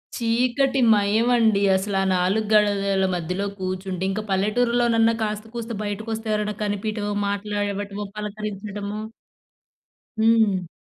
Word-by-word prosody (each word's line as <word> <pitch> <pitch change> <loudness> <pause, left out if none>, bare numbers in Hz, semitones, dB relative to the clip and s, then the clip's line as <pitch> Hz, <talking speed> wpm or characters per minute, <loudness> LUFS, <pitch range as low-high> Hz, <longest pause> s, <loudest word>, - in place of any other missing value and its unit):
చీకటి 250 +4 +1
మయమండి 220 +1 +3
అసల. 195 +1 -1
ఆ - - -1
4 190 +4 +1
గడలల 200 -2 +3
మధ్యలో 180 +3 -2
కూర్చుంటే 185 0 -3
ఇంక 200 +2 -2
పల్లెటూరులోనన్న 230 +3 +2
కాస్త 210 0 -3
కూస్త 235 0 -5
బయటకొస్తే 220 +2 -4
ఎవరైనా 210 0 -1
కనిపియడమో 205 0 -2
మాట్లాడటమో 205 0 -3
పలకరించడమో 210 0 -5 1.2
హ్మ్. 220 -5 +3
210 Hz, 100 wpm, -23 LUFS, 200-225 Hz, 1.2 s, మయమండి